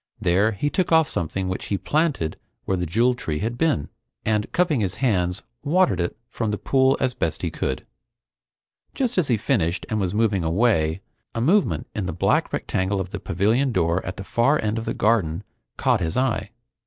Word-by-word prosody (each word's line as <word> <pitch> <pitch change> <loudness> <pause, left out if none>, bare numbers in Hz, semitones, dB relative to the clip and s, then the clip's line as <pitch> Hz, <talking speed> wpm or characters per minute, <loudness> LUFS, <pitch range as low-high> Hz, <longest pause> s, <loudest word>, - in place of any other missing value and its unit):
There, 100 +3 +2
he 145 +9 -1
took 185 -3 0
off 160 -2 +5
something 95 +3 -2
which 95 - -3
he 100 - -1
planted 145 - 0 0.3
where 95 - +1
the 90 -1 -2
Jewel 115 +9 +3
Tree 85 -11 -3
had 115 +7 -2
been, 120 - +1 0.4
and 105 -1 0
cupping 175 -7 +2
his 95 -3 -1
hands, 90 -8 0 0.2
watered 160 - +3
it 85 - -2
from 115 -2 -3
the 105 - -1
pool 130 +3 +3
as 130 -2 +1
best - - -2
he - - -1
could. - - -3 1.1
Just 250 -7 0
as 165 - +1
he 120 - +2
finished 100 - 0
and 110 -2 0
was 95 0 -1
moving 105 -5 +2
away, 80 -2 +2 0.3
a - - -1
movement 180 - +2
in 100 -3 -3
the 95 - -3
black 85 - +1
rectangle 95 +1 -1
of 95 -1 -4
the 100 - -4
pavilion 110 +11 +1
door 85 -3 +1
at 90 - -5
the 95 - -5
far 120 +9 +2
end 110 +1 0
of 115 - -6
the - - -2
garden 100 -6 +1 0.3
caught - - +2
his 80 -1 -1
eye. 120 -6 0
105 Hz, 195 wpm, -23 LUFS, 90-130 Hz, 1.1 s, off